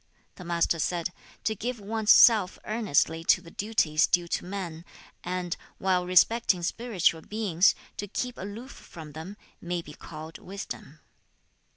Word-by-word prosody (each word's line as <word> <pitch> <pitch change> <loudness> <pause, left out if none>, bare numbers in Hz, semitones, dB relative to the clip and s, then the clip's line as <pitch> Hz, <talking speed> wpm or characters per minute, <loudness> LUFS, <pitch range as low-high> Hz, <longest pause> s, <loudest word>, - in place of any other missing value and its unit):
The 180 - -11
Master 170 -1 +1
said, 175 +2 -1 0.3
'To 220 - +1
give 235 +3 -4
one's 215 +1 +1
self 215 -6 +7
earnestly 175 -7 +1
to - - +5
the 170 -2 -14
duties 185 -8 +2
due 175 -1 +2
to - - -1
men, 175 -3 -6 0.4
and, 180 -1 -2 0.2
while 185 -2 +1
respecting 185 0 +4
spiritual 185 -5 0
beings, 200 -3 +2 0.2
to 205 - -4
keep 250 +5 -3
aloof 215 +7 -7
from 160 -3 -11
them, 160 +7 -8 0.2
may 175 -1 -3
be 150 - -11
called 155 0 -10
wisdom.' 195 +2 -8
180 Hz, 145 wpm, -28 LUFS, 170-210 Hz, 0.4 s, self